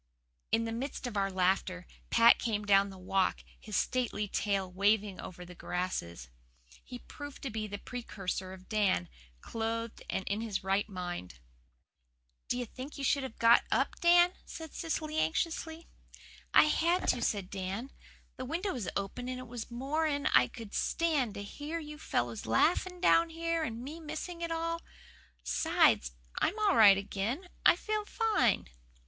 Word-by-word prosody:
'" - - -48
In 225 0 +2
the 225 - -3
midst 255 +4 -4
of 245 -3 -4
our 195 -1 +1
laughter 185 -1 0 0.2
Pat 230 0 +6
came 210 -3 -1
down 200 0 +5
the 190 - -10
Walk, 185 +1 0 0.2
his 215 -2 -6
stately 240 -4 0
tail 195 -2 -1
waving 200 +1 +1
over 180 0 -8
the 180 - -11
grasses. 170 - -4 0.6
He 250 - -8
proved 290 +3 -10
to 270 - -3
be 215 0 -3
the 205 0 -5
precursor 195 -5 -5
of 185 0 -12
Dan, 200 - +1 0.3
clothed 230 0 -3
and 190 - -1
in 205 +2 -1
his 215 -4 -3
right 195 +3 +1
mind. 175 - -5 1.1
"Do 245 - 0
you 250 - -2
think 260 +6 -9
you 280 - -5
should 280 +1 +2
have 265 -4 -7
got 230 0 +6
up, - - +1
Dan?" 350 0 +6
said 320 -2 -9
Cecily 315 -1 -2
anxiously. 320 - -1 0.6
"I - - +8
had 335 +4 +2
to," 245 - +2
said 200 -3 -1
Dan. 195 +7 -4 0.5
"The 255 - -5
window 345 +8 -2
was 230 -8 -3
open, 225 +6 -3
and 255 - -3
it 255 0 -8
was 235 -1 -6
more'n 285 +4 -1
I 125 - +6
could 220 - -10
stand 295 -10 0
to 200 - -5
hear 295 +10 -5
you 300 -2 -8
fellows 120 - -2
laughing 355 - +2
down 335 -2 +5
here 330 0 -1
and 230 -4 -4
me 300 +5 -7
missing 325 +2 -6
it 335 - -2
all. 330 0 -2 0.6
'Sides, - - +3 0.3
I'm 395 - +1
all 420 -2 +3
right 205 -3 +8
again. 215 - -3 0.2
I - - +7
feel 430 0 -2
fine." 415 - +1
230 Hz, 165 wpm, -32 LUFS, 195-310 Hz, 1.1 s, I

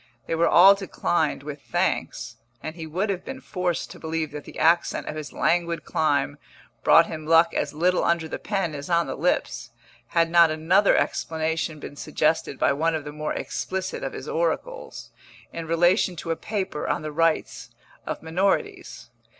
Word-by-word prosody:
They - - -3
were 165 +1 +3
all 190 +4 +8
declined 175 -7 -1
with 145 -1 -7
thanks, - - -2 0.3
and 155 - -5
he 160 -2 -7
would 190 +6 -1
have 185 - -4
been 265 0 -7
forced 180 -8 -3
to - - -11
believe 160 -1 -3
that 150 0 -8
the - - -11
accent 170 +2 +2
of 155 - -4
his 155 -1 -6
languid 170 -1 0
clime 145 -2 0 0.4
brought 165 - +7
him 155 -2 -7
luck 165 +1 +5
as - - -1
little 180 +4 +1
under 170 -1 +1
the - - -5
pen 195 -6 -2
as 145 +1 -7
on 170 -1 +3
the - - -4
lips, 135 -6 -1 0.4
had 165 -1 +1
not 170 -1 +6
another 170 +6 +3
explanation 160 -1 -1
been 145 - -9
suggested 155 -1 0
by - - +2
one 160 +3 0
of 155 - -3
the 145 - -7
more 150 0 -3
explicit 190 0 -4
of - - -4
his - - -7
oracles, - - -3 0.4
in 165 -1 -5
relation 175 +3 +3
to 165 0 -4
a - - +1
paper 190 -5 -4
on - - -1
the 155 - -4
rights 165 +1 0 0.3
of - - -5
minorities. 180 +5 -1
165 Hz, 180 wpm, -25 LUFS, 155-180 Hz, 0.4 s, all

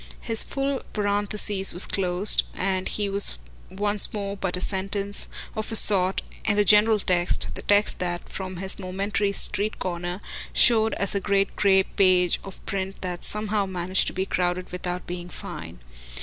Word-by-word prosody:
His 225 -1 +1
full 275 -1 -3
parenthesis 205 -1 +1
was 175 - +6
closed, 185 +1 +2
and 185 -1 -2
he 205 -1 -2
was 200 - +7 0.3
once 205 +1 +2
more 200 -1 -4
but 190 -2 -3
a - - -4
sentence, 195 +1 -2 0.3
of 220 +1 -4
a - - -1
sort, 190 -3 +4 0.2
in 205 - 0
the 205 0 +2
general 210 +2 +5
text, 180 -3 0
the - - -7
text 205 +1 +1
that, 175 -1 -4
from 185 -1 -7
his 190 +2 -5
momentary 200 +2 -2
street 205 +1 -1
corner, 175 0 -4 0.3
showed 225 -2 +4
as 200 - 0
a 200 - 0
great 195 0 0
grey 195 -2 +3
page 185 -2 +2
of 195 - -12
print 195 0 -4
that 180 -2 -5
somehow 210 -1 -1
managed 185 0 -1
to - - -1
be 190 +1 -2
crowded 180 -1 -2
without 180 0 -5
being 175 0 -7
"fine." - - -9
195 Hz, 165 wpm, -24 LUFS, 185-205 Hz, 0.3 s, was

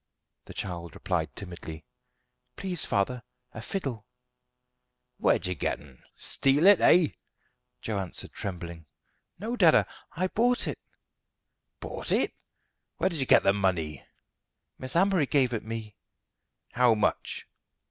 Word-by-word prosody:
The - - -11
child 85 -4 -5
replied - - -2
timidly: 85 -4 -8 0.7
"Please, 180 -4 -3
father, 115 +4 0 0.3
a 110 - -7
fiddle." 130 - -4 1.1
"Where - - +4
did - - -8
you 90 - 0
get 80 - -2
'un 70 -3 -17
steal 140 +5 +2
it, 200 -2 +8
eh?" 170 -3 +6 0.7
Joe 105 -3 -1
answered, 95 -3 -5
trembling: 85 -4 -6 0.5
"No, 225 +6 -3
dada, 175 -9 +6 0.3
I 185 +4 -1
bought 245 +4 +2
it." - - -4 1.0
"Bought - - -3
it! - - +2 0.6
Where - - +1
did 165 - -2
you 135 - 0
get - - +6
the 100 - +4
money?" 85 -8 -1 0.8
"Miss 130 +3 -5
Amory 185 -4 +3
gave 130 -4 +2
it 115 - -2
me." 110 -1 -6 0.8
"How 120 -2 +4
much?" 105 - -1
115 Hz, 130 wpm, -28 LUFS, -, 1.1 s, it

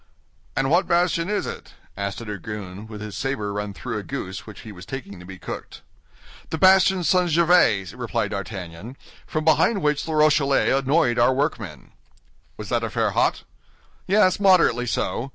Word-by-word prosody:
"And 135 +1 0
what 175 +3 +3
bastion 170 0 +1
is 210 - -1
it?" - - -8 0.2
asked 100 +3 -4
a - - -8
dragoon, 105 -1 -7
with 105 -2 -9
his 105 -3 -7
saber 105 -6 -3
run 105 0 -3
through 100 - -5
a - - -8
goose 95 +3 -6
which 110 - -10
he 110 - -10
was 90 -3 -11
taking 100 -8 -8
to 90 - -12
be 95 -1 -9
cooked. - - -8 0.7
"The 160 - -3
bastion 190 +1 +5
St. 180 +1 +2
Gervais," 160 - +3
replied 120 -4 -3
D'Artagnan, 100 +3 -7 0.3
"from 155 0 -3
behind 195 +4 +3
which 150 -1 +1
the 160 - -4
Rochellais 145 -2 +3
annoyed 135 -2 +2
our 125 +2 +4
workmen." 135 - -3 0.7
"Was - - -7
that - - 0
affair - - 0
hot?" - - +1 0.6
"Yes, 190 -1 +3
moderately 180 - +4
so. 125 +2 -2
130 Hz, 170 wpm, -23 LUFS, 105-165 Hz, 0.7 s, bastion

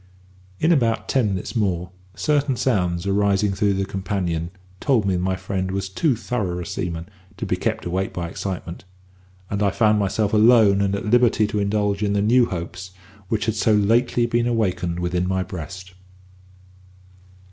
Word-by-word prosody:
In 160 - +3
about 115 -8 +1
ten 130 -5 +2
minutes 95 +4 -4
more, 90 -5 -1 0.2
certain 140 +6 +1
sounds 90 -8 0
arising 100 0 +2
through 100 0 +1
the 95 0 -1
companion 90 -4 -2 0.3
told 125 -8 +2
me 95 - +1
that 90 - -1
my 95 +1 0
friend 95 0 -3
was 95 0 -3
too 130 - +1
thorough 110 -6 -3
a 90 - -5
seaman 85 0 -4 0.3
to - - -4
be - - 0
kept - - -2
awake 95 +2 -2
by 85 -1 -4
excitement, 85 -1 -6 0.7
and 100 0 -1
I 100 - +3
found 105 +1 +2
myself 100 +1 0
alone 110 -2 +5
and 100 0 +1
at 100 - -4
liberty 120 -1 +3
to 105 0 -2
indulge 100 0 0
in 100 -1 +1
the 100 - +1
new 120 +3 +4
hopes 90 +1 -6 0.3
which 105 +1 -1
had 110 - 0
so 110 0 +2
lately 120 +4 +2
been 120 0 0
awakened 90 -7 -1
within 90 0 -1
my 95 0 0
breast. 90 +1 -8
100 Hz, 170 wpm, -22 LUFS, 90-110 Hz, 0.7 s, alone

